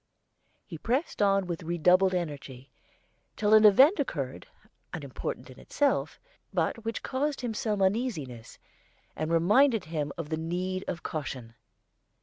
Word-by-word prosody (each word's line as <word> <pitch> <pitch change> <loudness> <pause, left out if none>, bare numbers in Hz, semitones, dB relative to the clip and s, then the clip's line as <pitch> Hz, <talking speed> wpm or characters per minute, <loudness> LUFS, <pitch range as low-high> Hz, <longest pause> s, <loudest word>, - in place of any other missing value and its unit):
He 165 -5 -9
pressed 255 - -1
on 195 -1 +3
with 175 -1 -4
redoubled 180 +3 +3
energy 140 -6 -5 0.6
till 210 0 +2
an 215 0 +7
event 265 - +7
occurred, - - -3 0.4
unimportant - - -6
in - - -14
itself, 285 -1 0 0.3
but 230 - -1
which 225 +1 -4
caused 280 +2 -2
him 240 -3 -3
some 210 -2 -1
uneasiness, 190 - -2 0.6
and 155 +1 -3
reminded 210 +7 +4
him 155 -3 -3
of 165 -3 -5
the 160 - -1
need 180 +3 -3
of 170 - -4
caution. 130 -6 -5
185 Hz, 135 wpm, -28 LUFS, 160-225 Hz, 0.6 s, an